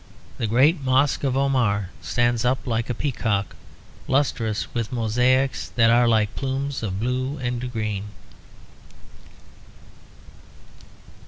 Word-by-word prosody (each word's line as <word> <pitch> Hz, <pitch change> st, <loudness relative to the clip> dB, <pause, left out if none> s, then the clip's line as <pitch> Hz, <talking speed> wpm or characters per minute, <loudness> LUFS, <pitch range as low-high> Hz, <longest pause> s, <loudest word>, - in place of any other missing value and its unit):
The 115 Hz, -, 0 dB
great 140 Hz, +9 st, +3 dB
Mosque 135 Hz, +2 st, +2 dB
of 135 Hz, -1 st, 0 dB
Omar 115 Hz, -9 st, +1 dB
stands 120 Hz, -1 st, 0 dB
up 130 Hz, +1 st, 0 dB
like 115 Hz, -1 st, -1 dB
a 125 Hz, -, -1 dB
peacock, 110 Hz, -7 st, -1 dB, 0.5 s
lustrous 130 Hz, -6 st, 0 dB
with 115 Hz, -1 st, -2 dB
mosaics 125 Hz, +3 st, +1 dB
that 115 Hz, -1 st, +5 dB
are 120 Hz, +1 st, +4 dB
like 110 Hz, -2 st, +2 dB
plumes 135 Hz, +1 st, -3 dB
of 100 Hz, -4 st, -3 dB
blue 130 Hz, +4 st, -2 dB
and 125 Hz, -1 st, -3 dB
green. 105 Hz, -3 st, -3 dB
125 Hz, 110 wpm, -23 LUFS, 110-130 Hz, 0.5 s, that